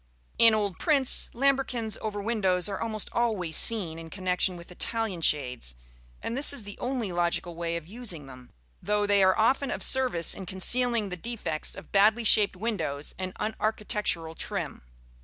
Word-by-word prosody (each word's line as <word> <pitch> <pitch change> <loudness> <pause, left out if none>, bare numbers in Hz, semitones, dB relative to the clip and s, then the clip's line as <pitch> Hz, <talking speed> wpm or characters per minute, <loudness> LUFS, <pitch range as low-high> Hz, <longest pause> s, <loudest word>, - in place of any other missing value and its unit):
In 230 -1 +7
old 200 -5 -2
prints, 280 -5 +3
lambrequins 255 -4 0
over 210 -2 -4
windows 195 -5 +1
are 200 -2 -4
almost 220 -2 -1
always 210 -9 0
seen 180 -8 +2
in 165 0 -9
connection 185 0 -1
with 170 +1 -12
Italian 220 -1 -3
shades, 125 - 0 0.5
and 230 - -3
this 280 +3 +6
is 280 -6 -1
the 205 0 -8
only 245 -6 -2
logical 175 0 -1
way 170 0 -3
of 165 - -8
using 185 - -6
them; 130 -2 -13 0.3
though 210 0 0
they 200 -1 +3
are 190 0 +4
often 265 +5 +2
of - - -3
service 250 - +3
in 190 - -7
concealing 230 +3 +1
the 180 - -6
defects 210 -6 -4
of - - -12
badly 215 +4 +4
shaped 210 -2 +5
windows 185 -9 -3
and 185 -1 -5
unarchitectural 210 -6 -2
trim. - - -4
205 Hz, 165 wpm, -27 LUFS, 175-230 Hz, 0.5 s, In